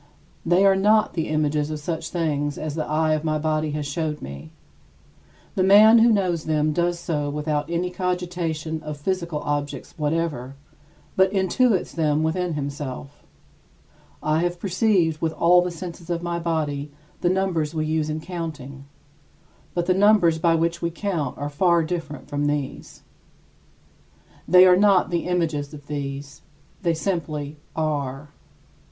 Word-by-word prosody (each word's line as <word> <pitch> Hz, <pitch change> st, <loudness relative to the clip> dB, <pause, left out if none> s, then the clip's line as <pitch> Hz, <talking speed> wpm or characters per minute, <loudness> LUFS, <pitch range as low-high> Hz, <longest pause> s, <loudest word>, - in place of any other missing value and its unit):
They 175 Hz, +4 st, +3 dB
are 195 Hz, -1 st, +6 dB
not 210 Hz, +3 st, +3 dB
the 160 Hz, -2 st, -2 dB
images 150 Hz, -1 st, 0 dB
of 155 Hz, -1 st, -4 dB
such 160 Hz, +2 st, -4 dB
things 145 Hz, -4 st, -1 dB
as 155 Hz, -1 st, -4 dB
the 155 Hz, 0 st, -2 dB
eye 155 Hz, +1 st, +1 dB
of 155 Hz, 0 st, -1 dB
my 155 Hz, -1 st, 0 dB
body 155 Hz, 0 st, 0 dB
has 150 Hz, -1 st, -3 dB
showed 150 Hz, +1 st, -2 dB
me. 70 Hz, +3 st, -9 dB, 1.0 s
The -, -, 0 dB
man 210 Hz, +4 st, +7 dB
who 230 Hz, +1 st, +6 dB
knows 180 Hz, -6 st, 0 dB
them 155 Hz, -1 st, +1 dB
does 175 Hz, +1 st, 0 dB
so 150 Hz, -4 st, -2 dB
without 150 Hz, 0 st, -2 dB
any 175 Hz, +1 st, -1 dB
cogitation 175 Hz, -4 st, -3 dB
of 150 Hz, -1 st, -6 dB
physical 170 Hz, -1 st, -2 dB
objects 145 Hz, -1 st, -3 dB
whatever, 150 Hz, -4 st, -2 dB, 0.6 s
but 190 Hz, 0 st, +4 dB
intuits 195 Hz, +2 st, +1 dB
them 155 Hz, -2 st, +1 dB
within 170 Hz, +1 st, -1 dB
himself. 140 Hz, -1 st, -6 dB, 1.0 s
I 155 Hz, +1 st, +2 dB
have 175 Hz, +1 st, -1 dB
perceived 185 Hz, -4 st, +1 dB
with 160 Hz, -1 st, 0 dB
all 175 Hz, +2 st, +5 dB
the 180 Hz, -, -1 dB
senses 170 Hz, 0 st, -8 dB
of 170 Hz, 0 st, -2 dB
my 170 Hz, 0 st, -2 dB
body 150 Hz, -4 st, -2 dB, 0.3 s
the 175 Hz, -, +1 dB
numbers 175 Hz, -5 st, 0 dB
we 155 Hz, -1 st, 0 dB
use 155 Hz, 0 st, -1 dB
in 155 Hz, +1 st, -3 dB
counting; 155 Hz, -6 st, -7 dB, 0.9 s
but 175 Hz, -1 st, 0 dB
the 185 Hz, -, +3 dB
numbers 190 Hz, -4 st, +4 dB
by 165 Hz, 0 st, +3 dB
which 165 Hz, +1 st, 0 dB
we 170 Hz, -, 0 dB
count 170 Hz, -3 st, -3 dB
are 145 Hz, -, -3 dB
far 170 Hz, +3 st, +2 dB
different 160 Hz, -3 st, -5 dB
from 145 Hz, 0 st, -1 dB
these. 145 Hz, -2 st, -4 dB, 1.4 s
They 180 Hz, 0 st, +8 dB
are 180 Hz, -1 st, +7 dB
not 195 Hz, -2 st, +4 dB
the 170 Hz, 0 st, -1 dB
images 160 Hz, -5 st, -1 dB
of 145 Hz, -1 st, -13 dB
these; 140 Hz, -1 st, -6 dB, 0.4 s
they 170 Hz, -3 st, +1 dB
simply 155 Hz, -4 st, -3 dB, 0.2 s
are. 145 Hz, -3 st, -2 dB
160 Hz, 155 wpm, -23 LUFS, 150-175 Hz, 1.4 s, They